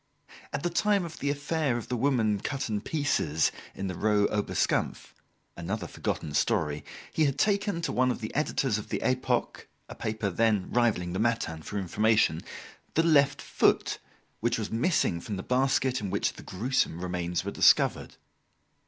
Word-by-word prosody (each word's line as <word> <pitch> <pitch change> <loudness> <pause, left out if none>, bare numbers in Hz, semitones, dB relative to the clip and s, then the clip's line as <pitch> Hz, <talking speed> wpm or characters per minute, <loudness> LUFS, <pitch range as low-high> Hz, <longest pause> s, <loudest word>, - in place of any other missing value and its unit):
At - - -3
the 175 - 0
time 200 +1 +2
of 165 - -9
the 140 - -1
affair 145 -2 0
of 120 - -6
the 125 - -2
woman 115 -5 +1
cut 135 +3 -3
in 105 -1 -1
pieces 110 - +1 0.2
in 95 - -4
the 95 - -2
Rue 105 +2 +2
Oberskampf 105 -1 -1 0.4
another 90 +3 -4
forgotten 75 -3 -4
story 75 0 0 0.3
he 160 - +3
had 140 -1 0
taken 200 0 +1
to - - -1
one 130 +1 +2
of 125 - -2
the 110 -2 -6
editors 135 -6 0
of - - -9
the - - -1
"Epoque," 130 -1 0 0.2
a - - -8
paper 110 -2 -2
then 105 -1 +1
rivalling 105 -8 +1
the 95 - -2
"Matin" 115 -9 0
for 105 - -5
information, 105 -2 +2 0.5
the 165 - +4
left 140 -4 +3
foot, - - +1 0.4
which - - 0
was - - -4
missing 115 - +1
from 105 - -5
the 95 - -5
basket 130 -1 +1
in 100 - -3
which - - 0
the - - -11
gruesome 115 -3 -1
remains 90 -1 -2
were - - -2
discovered. - - +3
115 Hz, 170 wpm, -28 LUFS, 95-140 Hz, 0.5 s, the